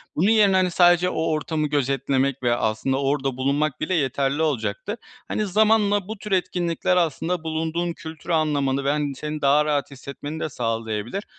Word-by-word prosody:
Bunun 180 +7 +2
yerine, 210 -3 +5
hani, 185 -1 +2
sadece 175 0 +4
o 160 - -2
ortamı 155 0 -1
gözetlemek 135 -1 0
ve 120 -1 +3
aslında 120 +4 -1
orada 135 -2 -1
bulunmak 140 +2 0
bile 155 +4 -1
yeterli 140 -1 0
olacaktır. 145 - -2 0.3
Hani, 215 - -1
zamanla 205 -1 +3
bu 220 +1 -6
tür 210 +1 -9
etkinlikler 180 -1 0
aslında 170 +1 0
bulunduğun 165 +2 -2
kültürü 160 +1 -6
anlamanı 140 -4 +1
ve, 140 - 0
hani, 145 -2 -1
seni 150 +3 -5
daha 145 +2 +4
rahat 145 -2 -1
hissetmeni 140 +3 -7
de 155 - -2
sağlayabilir. 115 - -3
150 Hz, 165 wpm, -23 LUFS, 135-175 Hz, 0.3 s, yerine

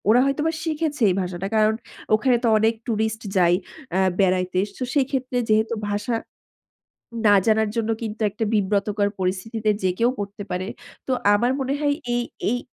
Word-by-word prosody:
ওরা 235 +3 +6
হয়তোবা 295 +4 +1
শিখেছে 310 -3 -2
এই 180 - +1
ভাষাটা। 180 +1 -4
কারণ 215 0 +4 0.4
ওখানে 245 +4 +4
তো - - +3
অনেক 220 +1 +3
টুরিস্ট 220 -1 -1 0.2
যায় 175 -1 +5 0.4
অ্যা 190 - +2 0.2
বেড়াইতে। 185 -1 +2 0.2
তো - - -3
সেই 280 -3 +3
ক্ষেত্রে 255 -2 -2
যেহেতু 220 +1 +3 0.2
ভাষা 205 +3 -1 1.1
না 205 - +7
জানার 220 -1 +3
জন্য 225 -1 0
কিন্তু 220 0 -5
একটা 215 +3 -3
বিব্রতকর 205 0 +1
পরিস্থিতিতে 210 +4 -1
যে 185 - +2
কেউ 235 +1 +3
পড়তে 205 0 -5
পারে। 180 +1 -2 0.4
তো 265 - -1 0.2
আমার 240 +4 +2
মনে 265 +1 -1
হয় 290 -1 +2 0.2
এই 240 - +1 0.3
এই 245 - +1
220 Hz, 165 wpm, -23 LUFS, 200-245 Hz, 1.1 s, না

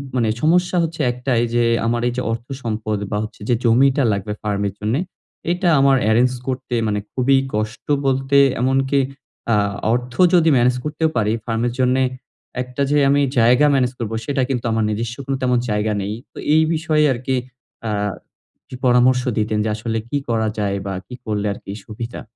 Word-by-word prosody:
মানে 115 -3 +2
সমস্যা 180 +3 +2
হচ্ছে 165 -1 -3
১ 120 - -9
টাই 120 -3 +3
যে 120 - +3 0.2
আমার 120 +1 0
এই 120 - -1
যে - - 0
অর্থ 115 +2 -4 0.2
সম্পদ 110 -2 -2
বা 105 - 0
হচ্ছে 110 -1 -9
যে 120 - +4
জমিটা 135 +4 +4
লাগবে 100 +1 -3
ফার্মের 100 -1 -1
জন্যে 110 +6 0 0.5
এটা 180 0 +1
আমার 135 0 +5
এরেঞ্জ 120 +3 +4 0.2
করতে 130 -1 -3
মানে 105 -1 0
খুবই 135 +1 +3 0.2
কষ্ট 110 +3 -4 0.2
বলতে 135 +1 +2 0.2
এমনকি 135 +2 +2 0.5
আ - - +4 0.4
অর্থ 125 0 -2 0.2
যদি 165 -2 +5
মেনেজ 125 +1 +3
করতেও 155 +1 0
পারি, 105 -1 +2
ফার্মের 120 +1 -1
জন্যে 130 +1 +3 0.6
একটা 125 +2 -6
যে 150 - +3
আমি 140 +1 +3 0.2
জায়গা 125 +5 +5
মেনেজ 125 -2 +2
করব 115 -2 -3
সেটা 140 0 0
কিন্তু 125 -3 -2
আমার 110 0 +1
নিজস্ব 115 +2 -3
কোন 135 - -2
তেমন 125 -1 +2
জায়গা 105 +1 0
নেই। 100 +2 -3 0.2
তো - - -15 0.2
এই 160 - +5
বিষয়ে 155 -1 +1
আরকি 130 +1 -1 0.5
আ - - -1 0.8
কিছু - - -9
পরামর্শ 125 +1 +4 0.2
দিতেন 110 0 0
যে - - 0
আসলে 115 +1 -3
কি 145 - 0
করা 110 -1 +1
যায়? 100 -1 0
বা 100 - -3
কি 125 - -8
করলে 105 -2 -2
আরকি 100 - -9
সুবিধা? 115 +2 -7
125 Hz, 180 wpm, -20 LUFS, 110-135 Hz, 0.8 s, আমার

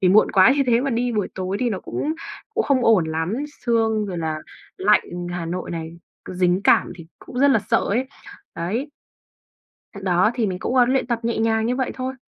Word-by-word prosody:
vì 185 - +3
muộn 205 +4 +5
quá 190 +5 +6
như 280 - +3
thế 235 -1 +3
mà 275 +1 -1
đi 240 +1 0
buổi 210 -3 -1
tối 185 +1 -3
thì 245 -2 +1
nó 195 - -3
cũng 305 - -3 0.4
cũng 445 - +1
không 260 -3 +2
ổn 215 -7 +5
lắm, 160 +5 -2 0.3
sương 225 -3 +1
rồi 180 -3 -4
là 160 -1 -2 0.4
lạnh 210 +2 +4 0.3
Hà 175 -2 -4
Nội 180 +2 -4
này, 165 -1 -5 0.3
cứ - - -8
dính 180 0 +2
cảm - - +4
thì 165 -2 -11
cũng 250 - -8
rất 280 +2 +5
là 260 - +4
sợ - - +4
ấy, 245 +6 0 0.5
đấy. 215 - -3 1.0
Th - - -16
đó, 185 +3 +3
thì 230 -4 0
mình 185 -2 -3
cũng, 245 - -3
ơ, 250 - +7
luyện 260 0 +1
tập 235 -2 -1
nhẹ 235 - -1
nhàng 220 0 +1
như 250 +2 0
vậy 260 -1 -1
thôi. 260 0 -4
220 Hz, 225 wpm, -22 LUFS, 180-245 Hz, 1.0 s, ơ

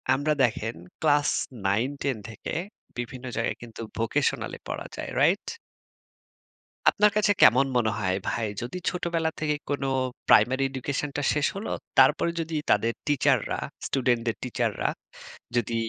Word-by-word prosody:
আমরা 150 +3 +1
দেখেন 115 -1 0 0.3
ক্লাস 145 -2 +4 0.4
৯ 110 +7 +2
১০ 135 -5 0
থেকে 110 - -6 0.4
বিভিন্ন 125 +1 -5
জায়গায় 115 - -1
কিন্তু 115 -1 -9 0.2
ভোকেশনাল 135 +5 0
এ - - -29
পড়া - - -4
যায়। - - -4
রাইট? - - +3 1.4
আপনার 210 0 +4
কাছে 205 -1 +4
কেমন 130 +3 +7
মনে 110 -2 +2
হয় 95 -2 +1
ভাই? 115 -2 0
যদি 120 +9 -5
ছোটবেলা 170 -2 -1
থেকে 150 -1 0
কোন 140 -1 -1 0.5
প্রাইমারি 130 +5 +5
এডুকেশন 135 +2 -2
টা - - 0
শেষ 150 -1 +1
হলো, 200 - -4 0.3
তারপরে 150 +5 +5
যদি 160 0 -4 0.2
তাদের 115 +3 +3
টিচাররা 145 -2 +2 0.3
স্টুডেন্টদের 120 -3 +1
টিচাররা 125 - -1 0.7
যদি 115 -1 0
130 Hz, 135 wpm, -26 LUFS, 115-150 Hz, 1.4 s, কেমন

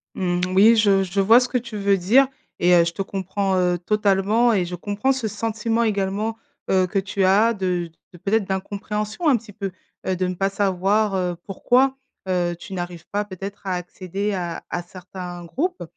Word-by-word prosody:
Mmh, 175 -1 0
oui, 220 +4 +7
je 200 -3 +4
je 195 +2 0
vois 225 +5 +7
ce 250 - -1
que 250 - +1
tu 235 -3 -6
veux 200 -1 +2
dire 245 +10 +4 0.3
et 180 +1 +4
heu, 170 -1 +7
je 170 - -1
te 195 - -4
comprends, 195 0 -2
heu, 180 -1 +2
totalement 210 +4 +2
et 185 -4 +1
je 180 +1 -5
comprends 205 +8 -1
ce 260 -4 -1
sentiment 225 +2 -1
également, 210 +1 -1 0.3
heu, 185 -1 +3
que 195 - 0
tu 190 0 -2
as 210 +5 +4
de 180 -4 -2 0.2
de - - -11
peut-être 200 +3 0
d'incompréhension 210 - -3
un 265 -5 +5
petit 210 -2 -13
peu. 195 -3 -4 0.4
Heu, 185 - +1
de 185 0 -1
ne 180 - -2
pas 195 +2 0
savoir, 195 +1 +1
heu, 180 -2 -1
pourquoi, 260 +7 +2 0.3
heu, 175 -1 0
tu 190 +2 -10
n'arrives 175 -2 -5
pas, 205 +1 -1
peut-être, 195 +1 -8
à 185 - 0
accéder 185 +3 -4
à 175 -3 -4
à 175 - -2
certains 180 0 -9
groupes. 345 - -2
195 Hz, 195 wpm, -22 LUFS, 180-215 Hz, 0.4 s, oui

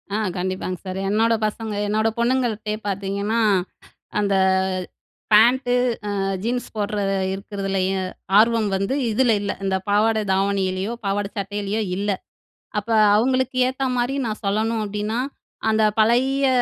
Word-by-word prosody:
ஆ. - - +1 0.2
கண்டிப்பாங்க 185 0 -3
சார். 185 0 -4
என்னோட 225 +3 +3
பசங்க 220 0 -5
என்னோட 215 +2 +1
பொண்ணுங்கள்ட்டயே 235 -4 0
பார்த்தீங்கன்னா, 200 +3 -1 0.8
அந்த 200 -1 +1 1.0
பேன்ட்டு 245 +4 +5 0.4
அ - - -1 0.2
ஜீன்ஸ் 245 +3 -1
போடுற 210 0 -2 0.4
இருக்கிறதுலயும் 195 -1 -2 0.3
ஆர்வம் 225 -1 +4
வந்து, 195 +6 -1 0.2
இதில 235 +2 +3
இல்ல. 200 - -1
இந்த 190 -1 +1
பாவாடை 215 +2 +3
தாவணியிலயோ, 195 +1 0
பாவாடை 200 0 -1
சட்டையிலேயோ, 205 +2 -2 0.2
இல்ல. 205 +2 -1 0.7
அப்போ 215 +2 -1 0.2
அவங்களுக்கு 255 +3 +1
ஏத்த 260 +1 -3
மாரி 245 +3 0
நான் 215 -2 -4
சொல்லணும் 220 +3 0
அப்படின்னா, 210 +3 -2 0.5
அந்த 220 0 +3 0.2
பழைய 260 +5 +3
210 Hz, 120 wpm, -22 LUFS, 200-230 Hz, 1.0 s, பேன்ட்டு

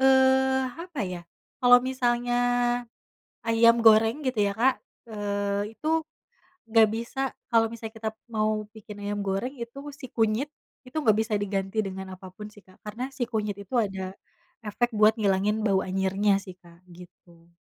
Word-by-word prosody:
eee, 265 0 +4
apa 335 -2 -7
ya, 180 -1 -6 0.4
kalau 245 0 +8
misalnya 245 -1 0 1.1
ayam 230 +1 +5
goreng, 225 +5 +5
gitu 255 -5 -1
ya 200 - 0
Kak, 255 +5 +3 0.3
eee, 205 0 -2
itu 315 +4 -1 0.7
nggak 225 -1 +6
bisa 235 +4 -4 0.3
kalau 230 -1 +4
misalnya 225 0 -8
kita 220 0 -2 0.2
mau 215 -1 0
bikin 210 -1 -11
ayam 205 0 -3
goreng, 195 +8 -2
itu 235 +3 -7 0.2
si 260 - -8
kunyit, 225 +5 +1 0.4
itu 255 +5 -12
nggak 215 -6 +4
bisa 220 -1 0
diganti 205 +1 -1
dengan 190 -1 -6
apapun 185 +3 -10
sih, 205 -1 -17
Kak. 185 0 -22
Karena 240 +5 -5
si 260 -3 -3
kunyit 210 -4 -3
itu 200 +4 -9
ada, 190 -4 -1 0.5
efek 235 +3 -1
buat 215 +1 +5
ngilangin 210 +1 +1
bau 195 -2 +3
anyirnya 195 +2 +1
sih 185 -2 -10
Kak, 170 +1 -19
gitu. 170 -1 -17
215 Hz, 155 wpm, -26 LUFS, 200-240 Hz, 1.1 s, kalau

